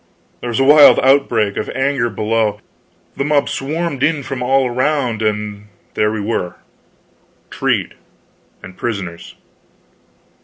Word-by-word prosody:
There - - -6
was 120 +1 -2
a - - +4
wild 145 +1 +7
outbreak 130 -6 +2
of - - -3
anger 130 -3 0
below, 110 -1 0
and 105 - -22 0.6
the - - 0
mob 145 0 +1
swarmed 150 0 -3
in 150 -1 +1
from 125 0 -5
all 135 +1 +2
around, 125 -2 -1
and 105 -1 -3 0.3
there 105 0 +1
we 110 - -3
were 100 -4 -3 1.0
treed, - - -1 0.7
and 95 - -11
prisoners. 95 -8 -5
120 Hz, 130 wpm, -17 LUFS, 105-140 Hz, 1.0 s, wild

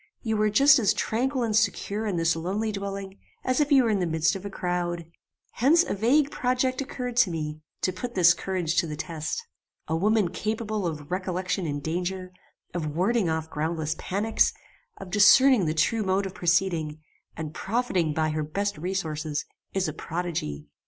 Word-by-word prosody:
You 220 -2 0
were 215 0 +2
just 275 +6 +6
as 210 -5 +2
tranquil 255 +3 0
and 220 -2 0
secure 215 0 0
in 200 - -1
this 165 -1 +2
lonely 195 +7 -2
dwelling, 195 -1 -5 0.2
as 255 +2 +1
if 295 0 +1
you 270 -2 +6
were 230 - +2
in 205 - +1
the 180 - 0
midst 160 +1 +1
of 190 - -6
a 200 - -4
crowd. 175 -2 -2 0.5
Hence 310 +8 +4
a - - -3
vague 270 +8 +2
project 255 +1 0
occurred 250 -3 -5
to 220 - +5
me, 155 -2 -4 0.2
to 185 - 0
put 240 +6 -6
this 180 -1 +6
courage 175 -3 -2
to 170 -1 +3
the 150 - -4
test. 160 - -4 0.4
A 160 - 0
woman 205 +2 +2
capable 215 -1 -2
of 150 -1 -6
recollection 185 -1 -2
in 145 -1 -3
danger, 180 +3 -3 0.4
of 155 -4 -3
warding 195 +2 +2
off 160 0 -2
groundless 155 0 -2
panics, 210 +4 +1 0.4
of 180 - -9
discerning 210 +1 +6
the 155 - -1
true 220 +9 +2
mode 195 0 +1
of 190 - -5
proceeding, 170 -4 0 0.4
and 155 -2 -5
profiting 190 -6 0
by 155 +1 0
her 155 0 -1
best 200 +5 -2
resources, 155 -4 -3 0.3
is 190 -1 +1
a 155 - -3
prodigy. 160 - -4
185 Hz, 180 wpm, -26 LUFS, 165-220 Hz, 0.5 s, just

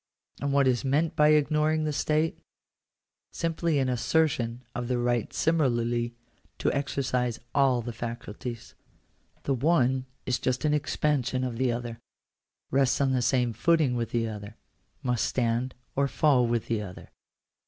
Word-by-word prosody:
And 140 0 0
what 140 -1 +4
is 125 -2 +2
meant 145 +4 +1
by 150 - +5
ignoring 155 +1 +3
the 155 -1 -1
state? 155 +2 0 0.9
Simply 165 -1 0
an 135 -2 +1
assertion 125 -2 0
of 120 0 -3
the 125 0 0
right 120 -1 0
similarly 120 -6 +1 0.4
to - - 0
exercise 130 -4 -1
all 130 -4 +3
the 120 0 -5
faculties. 115 0 -6 0.7
The 140 - 0
one 130 -2 +2 0.2
is 125 -1 0
just 130 +2 -1
an 150 - +3
expansion 140 -3 0
of 125 -3 -3
the 130 0 +1
other 120 -1 -4 0.4
— - - -53
rests 135 -1 +2
on 135 -1 +2
the 130 -1 +1
same 120 -1 +1
footing 160 -2 +2
with 115 -2 -2
the 115 -1 0
other 105 -1 -8 0.2
— - - -41
must 125 -2 +1
stand 120 +1 0 0.2
or 140 0 +2
fall 135 -4 +3
with 115 -1 0
the 115 -2 -1
other. 95 -3 -9
130 Hz, 155 wpm, -27 LUFS, 120-145 Hz, 0.9 s, by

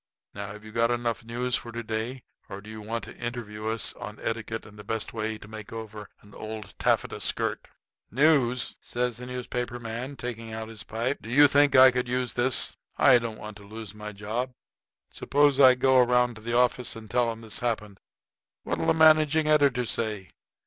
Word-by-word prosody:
Now, 100 0 -6
have 105 +1 -11
you 110 - -10
got 115 +1 +2
enough 120 -1 -1
news 120 +2 -1
for 115 - -4
to 120 0 -5
day, 115 +3 -4 0.3
or 95 - -6
do 105 +2 -11
you 110 0 -8
want 115 +1 -4
to - - -9
interview 115 -3 -5
us 110 0 -1
on 105 - -8
etiquette 115 0 -4
and 105 0 -14
the - - -8
best 110 0 -3
way 110 -1 -3
to 105 - -13
make 110 -1 -9
over 110 -2 -8
an 105 0 -17
old 110 -1 -7
taffeta - - +1
skirt?" - - -1 0.4
"News!" 130 -3 +2
says 120 -1 -2
the 125 +1 -8
newspaper 125 -1 -4
man, 120 +4 -5
taking 115 -3 -6
his 110 -1 -6
pipe 120 +5 -2
out; - - -33
"do 110 - -9
you 145 +4 +7
think 145 0 +4
I 130 0 +9
could 125 0 -1
use 125 0 -1
this? 125 0 +1 0.2
I 130 -3 +6
don't 115 -2 -5
want 105 -1 -9
to 100 - -14
lose 110 0 -9
my 105 0 -7
job. 110 +5 -4 0.6
Suppose 145 -1 +2
I 130 -2 +8
go 130 0 +4
around 125 0 +3
to 110 - -12
the 120 +2 -1
office 125 -1 +2
and 110 -1 -10
tell 120 +1 +1
'em 115 0 -9
this 110 -2 -2
happened. 105 -4 -3 0.6
What'll - - -2
the - - +4
managing 155 -1 +5
editor 140 -5 +3
say? 105 -8 -2
115 Hz, 200 wpm, -27 LUFS, 110-125 Hz, 0.6 s, I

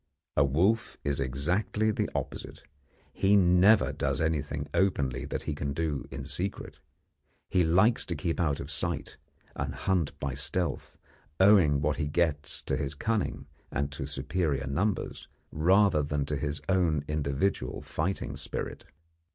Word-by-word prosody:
A 70 - +5
wolf 90 +12 +1
is 70 -1 0
exactly 90 - 0
the - - -1
opposite. - - -5 0.5
He 100 +2 +3
never 95 +3 +5
does - - -1
anything 75 -3 -1
openly 70 -10 +1
that - - -4
he 75 - -2
can 70 -1 -3
do 75 -2 -2
in 65 0 -6
secret. 90 +8 -4 0.7
He 90 -2 +4
likes 95 +8 +4
to 85 - -2
keep 80 +3 -2
out 75 -5 +1
of 70 +2 -6
sight, 70 - -3 0.4
and - - -3
hunt 90 -6 -1
by 70 -1 -2
stealth, 85 +6 -2 0.4
owing 95 -8 +6
what 75 0 0
he 75 - -1
gets 75 -1 0
to - - -1
his 70 +1 -3
cunning 100 -6 -1 0.2
and 70 +1 -2
to 70 -1 -5
superior 70 0 -1
numbers, 95 +10 -2 0.2
rather 90 +1 +4
than 75 -1 -1
to 75 - -2
his 75 +1 -3
own 85 -6 +2
individual 70 -1 -1
fighting 90 +5 -2
spirit. - - -5
75 Hz, 145 wpm, -29 LUFS, 70-95 Hz, 0.7 s, owing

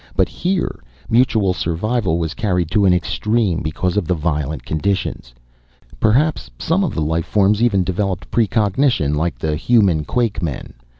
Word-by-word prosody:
But - - +2
here, 185 0 -2 0.3
mutual 110 -5 +3
survival 90 +2 -1
was 80 -2 -2
carried 90 -6 -1
to 100 +1 +3
an - - +5
extreme 100 +1 0
because 90 +5 -2
of 95 -6 0
the 90 - +1
violent 75 -2 -2
conditions. 80 -6 -2 0.7
Perhaps 140 +9 +2
some 185 +5 0
of 175 - -2
the 80 - 0
life 80 +2 -1
forms 105 +1 +2
even 105 -6 +3
developed 95 +1 -3
precognition 110 - +1
like 75 -2 -1
the 75 +3 -1
human 95 -4 +2
quakemen. 100 - -2
95 Hz, 145 wpm, -19 LUFS, 80-110 Hz, 0.7 s, an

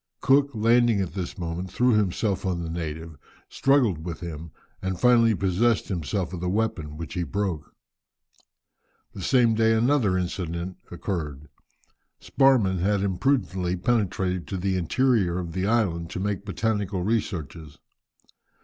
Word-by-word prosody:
Cook, 140 +1 +4
landing 115 0 +3
at 90 -5 -2
this 90 0 -5
moment, 85 +1 -4
threw 125 +5 +2
himself 105 -1 0
on 90 -3 -1
the 80 - -5
native, 80 -2 -6 0.3
struggled 120 - +2
with 85 -2 -5
him 85 -2 -7 0.3
and 95 -1 -3
finally 115 -3 +5
possessed 100 +5 +1
himself 90 0 -2
of 85 - -5
his 90 - -1
weapon, 90 -8 -2
which 80 -3 -7
he 90 - -2
broke. 90 -4 -3 1.4
The 95 - -8
same 120 +1 +3
day 110 0 +3
another 115 -4 +2
incident 90 0 -3
occurred. 80 -5 -5 0.7
Sparrman 120 -10 +3
had 100 +2 +1
imprudently 95 -3 0
penetrated 95 - 0
to 95 - -4
the 95 +1 -1
interior 95 0 +1
of 85 -2 -4
the 95 +1 -1
island 95 -8 0
to - - -5
make 100 0 -2
botanical 100 -1 -1
researches. 85 -8 -3
95 Hz, 140 wpm, -25 LUFS, 85-110 Hz, 1.4 s, finally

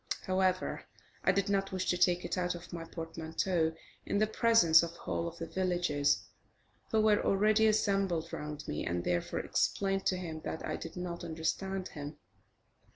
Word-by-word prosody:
However, 185 0 +1 0.4
I - - +5
did 200 0 0
not 195 -1 0
wish 185 -1 -2
to - - +1
take 180 0 +2
it - - -2
out 180 -1 0
of 175 +1 -10
my 165 -1 -5
portmanteau 165 0 -2 0.3
in - - -1
the 215 - +4
presence 215 -7 +5
of 170 0 -4
the 170 - -16
whole 170 - -2
of 170 0 -7
the 165 - -4
villagers, 175 -6 +1 0.7
who 220 - +3
were 215 -1 +4
already 215 +2 +4
assembled 195 -6 +1
round 150 0 -5
me, 75 - -2
and, 85 0 -1
therefore, 85 0 -1
explained 195 -1 0
to 185 - +2
him 160 -3 -5
that 160 - -4
I - - -2
did 165 - -7
not 175 -1 -5
understand 185 +3 -2
him. 145 0 -7
180 Hz, 175 wpm, -32 LUFS, 160-195 Hz, 0.7 s, I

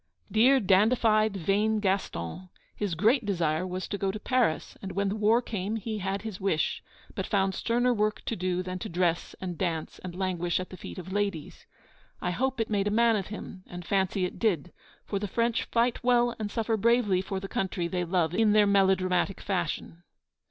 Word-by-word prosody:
Dear, 255 +5 +5
dandified, 215 +1 +3
vain 205 +5 +1
Gaston! 190 - -2 0.3
His 200 -5 -2
great 225 - +3
desire 175 -4 0
was 185 +1 -4
to 200 - -3
go 195 - 0
to 205 +2 -3
Paris, 245 -9 0
and 195 -1 -6
when 200 0 0
the 200 - -2
war 220 +3 +3
came 210 -1 -3
he 220 0 -3
had 195 +1 -2
his 215 -4 -6
wish; 190 -5 0 0.3
but - - -3
found 195 -2 +1
sterner 245 +4 +1
work 215 -1 -1
to 230 - -2
do 180 -1 -1
than 185 0 -5
to - - -5
dress 170 -1 0
and 180 -3 -5
dance 165 -4 -2
and 180 -1 -7
languish 175 -2 0
at 185 - -6
the - - -7
feet - - -9
of 185 0 -7
ladies. 200 -7 -3 0.5
I 180 - -1
hope 260 +6 -1
it 225 - +1
made 205 -1 0
a - - +2
man 230 +2 +4
of 195 -3 -2
him, 200 -3 -8
and 175 -1 -8
fancy 190 0 +1
it 180 - -6
did; 180 -7 0 0.3
for 200 - -2
the 205 - -3
French 230 +3 0
fight 240 +1 0
well 240 -1 +3
and 210 -1 -2
suffer 225 +1 0
bravely 215 -4 +3
for 190 0 -4
the 195 - -6
country 185 -3 -2
they 180 0 -1
love 170 -2 0
in 215 +1 +3
their 210 -1 +6
melodramatic 190 -2 +2
fashion. 175 -2 -3
195 Hz, 200 wpm, -28 LUFS, 185-220 Hz, 0.5 s, their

